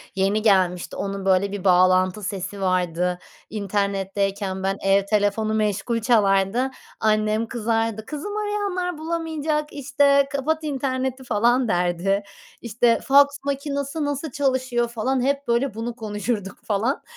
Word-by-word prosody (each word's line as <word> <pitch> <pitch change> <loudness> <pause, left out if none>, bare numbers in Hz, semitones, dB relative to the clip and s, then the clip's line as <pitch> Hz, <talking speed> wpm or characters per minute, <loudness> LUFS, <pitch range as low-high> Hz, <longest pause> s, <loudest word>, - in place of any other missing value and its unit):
yeni 195 +3 +1
gelmişti, 185 -4 +2
onun, 195 -1 -4
böyle, 195 +1 +2
bir 200 -2 -5
bağlantı 185 +2 +3
sesi 195 +1 -4
vardı. 180 -1 0 0.3
İnternetteyken, 195 -1 -2
ben, 195 +1 0
ev 195 0 +3
telefonu 210 +1 +1
meşgul 215 +2 0
çalardı. 215 +2 +2 0.3
Annem 215 +1 +1
kızardı, 225 -1 -1
"Kızım, 410 +8 -5
arayanlar 400 -5 -2
bulamayacak, 315 -2 -2
işte, 280 0 +3
kapat 310 +3 -1
interneti," 265 -2 -2
falan, 240 +2 +2
derdi. 180 +2 0 0.4
İşte, 235 +1 +2
faks 285 +1 +5
makinesi 280 +2 -2
nasıl 290 0 -3
çalışıyor, 255 -3 0
falan, 245 +3 -1
hep, 280 +2 0
böyle, 235 +2 +1
bunu 230 +2 -4
konuşurduk, 210 -2 -3
falan. 220 +6 -1
225 Hz, 120 wpm, -23 LUFS, 195-275 Hz, 0.4 s, faks